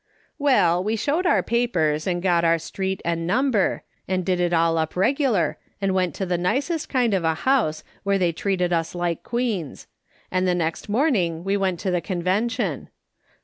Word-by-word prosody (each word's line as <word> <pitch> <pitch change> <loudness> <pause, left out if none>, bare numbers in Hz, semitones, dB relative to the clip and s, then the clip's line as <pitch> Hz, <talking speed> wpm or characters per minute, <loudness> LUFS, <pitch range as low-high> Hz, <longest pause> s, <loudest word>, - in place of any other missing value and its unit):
" - - -43
Well, 180 -8 +3
we 215 +3 0
showed 305 - 0
our - - +3
papers, 165 -11 0
and 175 -1 -1
got 175 -3 +3
our 165 0 +4
street 190 +3 -4
and 165 0 -1
number, 240 -1 +1 0.2
and 185 -1 -1
did 185 -2 +1
it 175 -1 +1
all 165 -1 +2
up 160 0 -2
regular, 210 - +1 0.2
and 195 -1 0
went 185 -4 0
to 190 - -2
the 175 -1 -1
nicest 275 - -1
kind 245 -5 +1
of 190 -3 +1
a 160 -1 +1
house, 220 - +1 0.2
wlierc 200 0 +2
they 180 -3 +2
treated 180 0 -1
us 165 +1 -1
like 175 -2 -2
queens; 230 - -3 0.5
and 185 0 +1
the 180 - +2
next 165 +2 -2
morning 205 - +1
we 195 +1 0
went 190 -3 0
to 190 - -1
the 175 -1 0
Con 175 -2 -4
vention. 205 - -1
185 Hz, 190 wpm, -23 LUFS, 170-220 Hz, 0.5 s, our